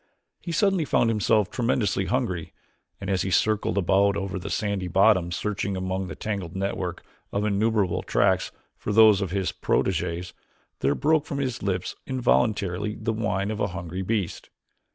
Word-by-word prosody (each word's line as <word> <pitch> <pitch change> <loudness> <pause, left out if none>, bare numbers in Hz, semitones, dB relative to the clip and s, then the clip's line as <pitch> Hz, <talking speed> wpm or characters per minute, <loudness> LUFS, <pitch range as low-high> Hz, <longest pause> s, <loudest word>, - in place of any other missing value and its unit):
He 170 - -6
suddenly 190 0 +2
found 115 -5 +2
himself 105 -1 +2
tremendously 115 -5 0
hungry 100 -10 -2 0.5
and 100 - -6
as 95 -1 +1
he 95 - -1
circled 105 0 +1
about 100 +2 +3
over 95 -1 -3
the 90 - -6
sandy 100 -4 -1
bottom 95 -1 +4
searching 100 +1 -2
among 95 0 -2
the - - -7
tangled 100 -5 -4
network 95 -2 -3 0.3
of 100 +1 -1
innumerable 105 -2 +1
tracks - - +1 0.2
for - - -4
those 105 -2 +6
of 95 - -1
his 95 +1 -1
proteges, 90 0 -1 0.5
there 70 +2 +1
broke 155 0 +2
from 140 - -3
his 130 -3 -2
lips 95 -2 -2
involuntarily 105 -6 +1
the 110 +1 -2
whine 105 -2 -1
of 110 - -4
a 100 - +1
hungry 90 0 -5
beast. 100 -2 -2
100 Hz, 160 wpm, -25 LUFS, 95-110 Hz, 0.5 s, those